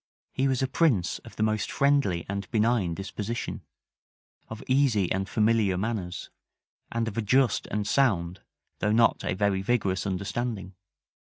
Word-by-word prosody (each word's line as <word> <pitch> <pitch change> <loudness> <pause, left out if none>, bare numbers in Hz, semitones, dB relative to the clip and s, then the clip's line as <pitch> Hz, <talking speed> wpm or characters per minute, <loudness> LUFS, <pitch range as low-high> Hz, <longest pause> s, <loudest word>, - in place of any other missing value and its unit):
He 135 - +1
was 130 -1 +1
a - - +1
prince 125 - +1
of - - -14
the - - -1
most 110 0 0
friendly 140 -12 +2
and 100 0 -4
benign 110 -6 +1
disposition, 105 +5 -4 0.9
of 110 +2 -8
easy 130 -9 +2
and 95 +1 -1
familiar 110 -4 +2
manners, 95 -4 -4 0.6
and 115 -1 -1
of 110 +1 -3
a - - +2
just 125 +3 +2
and 105 0 -2
sound, 95 -9 +1 0.4
though 105 - +1
not 115 +1 +3
a - - -1
very 95 0 +1
vigorous 100 -3 0
understanding. 100 +1 -3
105 Hz, 150 wpm, -27 LUFS, 95-120 Hz, 0.9 s, not